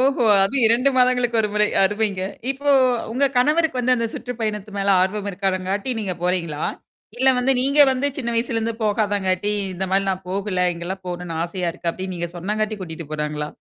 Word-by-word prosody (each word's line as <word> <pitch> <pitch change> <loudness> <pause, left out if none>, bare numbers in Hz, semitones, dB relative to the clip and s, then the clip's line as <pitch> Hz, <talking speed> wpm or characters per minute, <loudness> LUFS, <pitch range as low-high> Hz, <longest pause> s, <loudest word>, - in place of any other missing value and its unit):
ஓஹோ! 260 -2 +2 0.2
அதுவும் 240 +4 +2
2 240 +4 +4
மாதங்களுக்கு 250 -2 +3
ஒரு 210 - 0
முறை 210 0 +3 0.2
அருமைங்க. 205 -1 0 0.3
இப்போ 285 +2 0 0.4
உங்க 275 +3 +2
கணவருக்கு 300 +1 +2
வந்து 255 +1 +3
அந்த 230 0 0
சுற்று 250 - -5
பயணத்து 210 -1 -3
மேல 200 0 -1
ஆர்வம் 200 +2 -1
இருக்காதங்காட்டி 195 +4 -2
நீங்க 195 -4 -2
போறீங்களா? 170 -4 -1 0.5
இல்ல 260 +2 +3
வந்து 265 +2 +2
நீங்க 280 +3 +3
வந்து 260 +2 -1
"சின்ன 235 -4 -2
வயசுலருந்து 230 -1 -1
போகாதாங்காட்டி 205 -2 0 0.2
இந்தமாரி 190 +2 0
நான் 185 -1 -4
போகல. 190 -2 0
இங்கலாம் 185 +3 -6
போணுன்னு 175 -2 -5
ஆசையா 175 0 -3
இருக்கு." 170 0 -3
அப்பிடின்னு 185 +1 -6
நீங்க 170 0 -4
சொன்னாங்காட்டி 215 +3 -2
கூட்டிட்டு 160 -3 -8
போறாங்களா? 150 0 -3
205 Hz, 170 wpm, -22 LUFS, 185-240 Hz, 0.5 s, 2